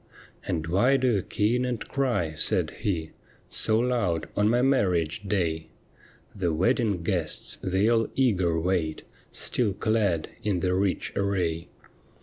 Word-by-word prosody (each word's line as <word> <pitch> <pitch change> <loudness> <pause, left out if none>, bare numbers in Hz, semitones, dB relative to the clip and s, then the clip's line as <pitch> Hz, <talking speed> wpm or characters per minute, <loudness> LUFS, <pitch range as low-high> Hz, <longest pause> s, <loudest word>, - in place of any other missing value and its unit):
' - - -22
And 80 -2 -1
why 100 +11 +3
do 130 -1 +2
you - - -1
keen 115 +7 0
and 120 -4 -3
cry,' 120 - -1
said 75 - 0
he, 85 -7 -2 0.2
' - - -30
So 110 - +3
loud 115 -8 0
on 105 +1 +3
my 120 +2 +2
marriage 90 - +1
day? 80 -5 -1 0.7
The 90 -4 -1
wedding 100 +1 +1
guests, 85 -4 0
they 95 +3 +1
all 115 -1 +3
eager 95 -11 +2
wait 85 -3 -1 0.3
Still 110 -6 0
clad 105 -6 0
in 100 -6 -1
their 90 0 +1
rich 95 0 -1
array. 90 -5 -1
95 Hz, 145 wpm, -26 LUFS, 85-115 Hz, 0.7 s, why